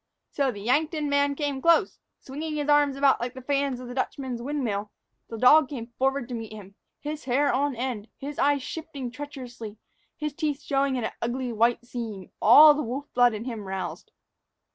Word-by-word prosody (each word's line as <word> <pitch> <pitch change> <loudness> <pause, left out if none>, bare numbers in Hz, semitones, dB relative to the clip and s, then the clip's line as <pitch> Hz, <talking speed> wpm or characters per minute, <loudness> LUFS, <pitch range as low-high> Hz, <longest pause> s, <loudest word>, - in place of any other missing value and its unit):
So, 280 -1 0
as 250 - -2
the 200 - -8
Yankton 300 - 0
man 285 0 +2
came 285 -2 -2
close, 335 +5 +3 0.2
swinging 305 +3 -6
his 295 0 -2
arms 290 -2 +4
about 275 -2 +3
like 245 +2 -4
the 260 - -8
fans 275 -2 0
of 250 - -8
the 245 - -7
Dutchman's 260 -2 -3
windmill, 235 -7 -2 0.4
the 225 - -6
dog 275 +5 +6
went 235 -3 -7
forward 270 -1 +1
to - - -5
meet 225 -2 -6
him, 200 -2 -11 0.3
his 300 0 -6
hair 280 +3 +2
on 280 +1 0
end, 235 -3 -4
his 285 +1 -7
eyes 285 -1 +2
shifting 285 -6 -6
treacherously, 250 -6 -8 0.4
his 300 -1 -3
teeth 295 -2 -2
showing 275 -1 +1
in 245 - -2
an - - -2
ugly 245 +1 -2
white 235 +2 +2
seam, 225 -6 -6
all 295 +7 +9
the 295 - -2
wolf 270 +3 -5
blood 245 -2 +4
in 215 +2 -6
him 225 -5 -5
roused. 190 0 -5
265 Hz, 195 wpm, -26 LUFS, 235-290 Hz, 0.4 s, all